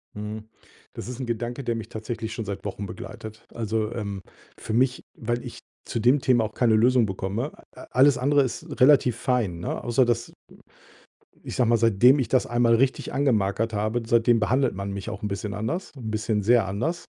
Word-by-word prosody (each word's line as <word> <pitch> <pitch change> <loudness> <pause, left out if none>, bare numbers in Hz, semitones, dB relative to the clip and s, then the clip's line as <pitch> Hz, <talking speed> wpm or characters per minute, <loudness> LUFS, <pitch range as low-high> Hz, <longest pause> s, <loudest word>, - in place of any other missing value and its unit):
Mhm. 105 +1 -6 0.5
Das - - -7
ist 125 0 -6
'n 130 - -3
Gedanke, 120 +3 -3
der 120 -1 -1
mich 115 -1 -6
tatsächlich 110 0 -5
schon 115 -1 -5
seit 100 0 -6
Wochen 100 0 -4
begleitet. 110 +2 -9
Also, 110 -1 -2
ähm, 100 -4 -4 0.4
für 110 - -5
mich, 125 +2 +1
weil 120 +1 -3
ich - - -8 0.3
zu 115 - -3
dem 125 +6 +4
Thema 125 -3 +3
auch 110 0 -4
keine 115 -2 +3
Lösung 120 +2 +4
bekomme, 100 +8 -3 0.2
äh, - - -11
äh, - - -10
alles 135 +2 +5
andere 140 +2 +3
ist 120 -2 -4 0.2
relativ 130 -3 +5
fein, 115 -11 0
ne, 85 - -4
außer 120 +2 +3
dass 120 -1 -1 1.1
ich - - -6
sage 120 -3 +2
mal, 120 - +5
seitdem 115 +5 +5
ich 130 -5 -1
das 130 +1 +2
einmal 120 -1 +3
richtig 130 +3 +1
angemarkert 115 -5 +1
habe, 110 +3 -1
seitdem 115 0 +4
behandelt 125 +3 +1
man 100 +1 -4
mich 100 +2 -6
auch 105 -1 -7
'n 105 - -1
bisschen 100 +1 -4
anders, 115 - -3
'n 115 -5 -6
bisschen 110 -1 -1
sehr 115 0 +4
anders, 125 - -2
115 Hz, 200 wpm, -25 LUFS, 105-125 Hz, 1.1 s, alles